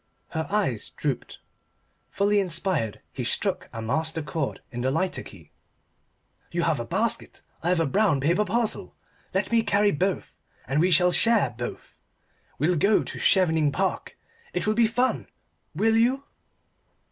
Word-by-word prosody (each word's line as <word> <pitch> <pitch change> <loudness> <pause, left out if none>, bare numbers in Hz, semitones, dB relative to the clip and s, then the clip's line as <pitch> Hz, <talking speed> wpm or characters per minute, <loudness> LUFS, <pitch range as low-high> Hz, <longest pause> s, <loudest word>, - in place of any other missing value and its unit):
Her 160 0 -3
eyes 190 - -1
drooped. - - -4 0.7
Fully 205 +1 +2
inspired, 170 - -1
he - - -4
struck - - 0
a 115 - -6
master 160 +7 -1
chord 145 0 -3
in 120 -1 -4
the 130 - +1
lighter 185 +7 -1
key. - - -13 1.0
"You - - 0
have - - +1
a - - -3
basket. - - -1 0.2
I 170 - -1
have 180 -1 +2
a 165 - +2
brown 190 -1 +2
paper 170 +9 +2
parcel. 220 +2 -1 0.4
Let - - -1
me 230 -1 +4
carry 205 -1 +3
both, 185 +5 -1 0.3
and 135 +4 +1
we 180 +2 +3
will 180 0 +3
share 230 - +3
both. 120 +1 -7 0.6
We'll 165 +5 +2
go 200 +7 +3
to - - -7
Chevening 160 -6 +3
Park. 135 - -2 0.4
It 180 - -1
will 215 - +2
be 230 0 +4
fun. 245 +3 0 0.5
Will 225 0 +3
you?" 250 +4 +2
180 Hz, 155 wpm, -26 LUFS, 150-210 Hz, 1.0 s, me